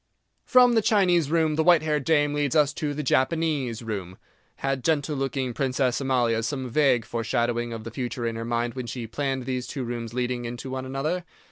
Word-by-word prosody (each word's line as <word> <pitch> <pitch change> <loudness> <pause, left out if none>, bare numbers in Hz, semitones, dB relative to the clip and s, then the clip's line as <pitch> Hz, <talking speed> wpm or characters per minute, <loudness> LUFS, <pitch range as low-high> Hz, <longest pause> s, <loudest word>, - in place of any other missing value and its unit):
From 250 -2 +6
the 225 - +4
Chinese 180 -8 +3
Room 160 -1 +2
the 160 - +3
white 175 -2 +5
haired 150 -3 0
dame 145 -2 +3
leads 145 -3 0
us 150 -2 +4
to 150 -2 -3
the 150 - -3
Japanese 135 -4 0
Room. 95 -5 -5 0.4
Had 135 -2 -2
gentle 150 -2 +1
looking 135 -2 -2
Princess 130 0 0
Amalia 120 -4 +1
some 130 +2 -3
vague 130 -4 +3
foreshadowing 120 0 -1
of 115 -1 -6
the 115 - -7
future 120 -1 -4
in 115 -1 -2
her 115 - -4
mind 120 0 -1
when 130 -2 -5
she 120 0 -5
planned 135 +2 -2
these 130 -1 -3
two 135 - -4
rooms 120 -1 -4
leading 125 -1 -1
into 120 +2 -6
one 130 0 -4
another? 150 +7 -2
130 Hz, 200 wpm, -25 LUFS, 120-150 Hz, 0.4 s, From